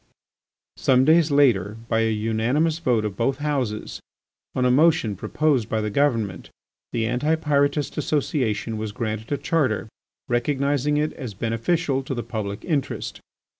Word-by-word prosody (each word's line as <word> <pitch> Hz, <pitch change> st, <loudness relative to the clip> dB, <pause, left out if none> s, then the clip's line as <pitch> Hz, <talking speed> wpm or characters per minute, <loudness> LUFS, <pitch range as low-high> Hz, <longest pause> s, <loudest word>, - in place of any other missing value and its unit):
_" -, -, -14 dB
Some 130 Hz, 0 st, +4 dB
days 160 Hz, +1 st, +5 dB
later 115 Hz, -8 st, +3 dB
by 115 Hz, -1 st, +1 dB
a 115 Hz, 0 st, +2 dB
unanimous 115 Hz, +9 st, 0 dB
vote 120 Hz, -8 st, +1 dB
of 105 Hz, -3 st, -3 dB
both 130 Hz, +5 st, 0 dB
Houses, 135 Hz, -8 st, -2 dB, 0.6 s
on 125 Hz, -, +1 dB
a 125 Hz, -, +4 dB
motion 150 Hz, -6 st, +3 dB
proposed 130 Hz, +2 st, 0 dB
by 110 Hz, -, 0 dB
the 105 Hz, -1 st, -2 dB
Government, 115 Hz, -7 st, 0 dB, 0.4 s
the 115 Hz, -1 st, 0 dB
Anti 125 Hz, +7 st, +1 dB
Pyrotist 145 Hz, -1 st, 0 dB
Association 125 Hz, -7 st, -1 dB
was 110 Hz, -1 st, -4 dB
granted 110 Hz, +1 st, -4 dB
a 145 Hz, -, +1 dB
charter 135 Hz, -12 st, 0 dB, 0.4 s
recognising 140 Hz, +3 st, +1 dB
it 150 Hz, +1 st, 0 dB
as 120 Hz, -6 st, -7 dB
beneficial 135 Hz, -, 0 dB
to 135 Hz, 0 st, -4 dB
the 120 Hz, -, -3 dB
public 105 Hz, -2 st, -5 dB
interest. 150 Hz, -6 st, -2 dB
125 Hz, 150 wpm, -23 LUFS, 110-145 Hz, 0.6 s, days